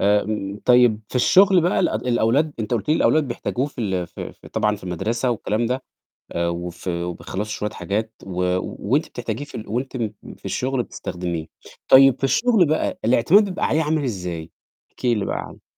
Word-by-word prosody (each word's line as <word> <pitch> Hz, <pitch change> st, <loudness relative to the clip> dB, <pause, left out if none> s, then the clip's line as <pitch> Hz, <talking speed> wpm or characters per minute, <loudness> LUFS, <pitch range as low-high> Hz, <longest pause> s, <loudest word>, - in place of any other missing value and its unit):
آمم 105 Hz, 0 st, +1 dB
طيب 125 Hz, -3 st, +5 dB
في -, -, -3 dB
الشُغل 190 Hz, +8 st, +6 dB
بقى 175 Hz, +2 st, +2 dB
الأد 110 Hz, +3 st, 0 dB
الأولاد 125 Hz, +6 st, +2 dB
أنت 110 Hz, +3 st, -1 dB
قُلتِ 105 Hz, +1 st, -3 dB
لي 155 Hz, -, +4 dB
الأولاد 155 Hz, -4 st, +3 dB
بيحتاجوه 125 Hz, +2 st, -2 dB
في 140 Hz, -4 st, -8 dB
ال 95 Hz, -5 st, -1 dB
في -, -, -8 dB
ف -, -, -18 dB
طبعًا 105 Hz, 0 st, 0 dB
في 95 Hz, -, -14 dB
المَدرسة 115 Hz, +8 st, -1 dB
والكلام 115 Hz, 0 st, -1 dB
ده 130 Hz, +2 st, -2 dB, 0.5 s
آآ 85 Hz, 0 st, -1 dB
وفي 85 Hz, 0 st, -4 dB
وبيخلّصوا 90 Hz, +3 st, -4 dB
شوية 105 Hz, 0 st, -2 dB
حاجات 110 Hz, +2 st, -3 dB
و 90 Hz, -1 st, -4 dB, 0.5 s
وأنتِ 150 Hz, +4 st, +3 dB
بتحتاجيه 120 Hz, +3 st, -4 dB
في 145 Hz, -, -12 dB
ال 110 Hz, -, -6 dB
وأنتِ 130 Hz, +3 st, -3 dB
م 110 Hz, -3 st, -2 dB, 0.3 s
في -, -, -20 dB
الشُغل 130 Hz, -1 st, -1 dB
بتستخدميه، 85 Hz, -6 st, -5 dB, 0.4 s
طيب 135 Hz, -1 st, +8 dB
في -, -, -12 dB
الشُغل 220 Hz, -, +4 dB
بقى 155 Hz, +1 st, -1 dB
الاعتماد 130 Hz, -, +5 dB
بيبقى 185 Hz, -2 st, -2 dB
عليه 160 Hz, +1 st, +2 dB
عامل 155 Hz, 0 st, 0 dB
إزاي، 90 Hz, -9 st, -4 dB, 0.4 s
احكي 120 Hz, -2 st, 0 dB
لي 100 Hz, -, -1 dB
بقى -, -, -2 dB
عنّه؟ -, -, -9 dB
115 Hz, 185 wpm, -22 LUFS, 100-135 Hz, 0.5 s, طيب